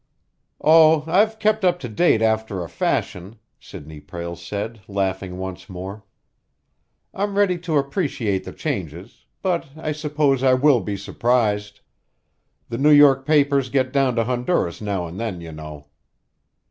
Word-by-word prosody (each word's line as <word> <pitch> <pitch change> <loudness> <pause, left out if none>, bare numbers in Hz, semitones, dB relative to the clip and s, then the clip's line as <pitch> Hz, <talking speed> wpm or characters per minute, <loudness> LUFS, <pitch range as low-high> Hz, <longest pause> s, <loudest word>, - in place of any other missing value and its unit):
"Oh, 160 0 +5
I've 210 +7 +2
kept 215 -1 +1
up 180 -1 +3
to 125 - -5
date 115 0 +2
after 110 -4 0
a - - -7
fashion," 95 +5 -2 0.2
Sidney 75 +1 -11
Prale 85 +3 -7
said, 100 +6 -6
laughing 95 -2 -3
once 95 -1 -7
more. 95 +3 -8 1.1
"I'm 200 0 -2
ready 190 -4 +2
to 165 -3 -1
appreciate 135 - -1
the - - -8
changes, 90 +4 -6 0.2
but 180 -5 -1
I 155 -1 -3
suppose 150 -3 0
I 130 -1 +4
will 135 -1 +4
be 105 -2 -4
surprised. 105 -1 -1 0.9
The 115 +1 -5
New 150 +2 +4
York 145 -2 +6
papers 140 -3 +3
get 130 0 0
down 135 -3 +2
to 115 - +2
Honduras 125 - -1
now 100 -4 -2
and 85 +3 -8
then, 110 -6 -4
you 85 -1 -9
know." 75 -1 -10
120 Hz, 145 wpm, -22 LUFS, 95-150 Hz, 1.1 s, York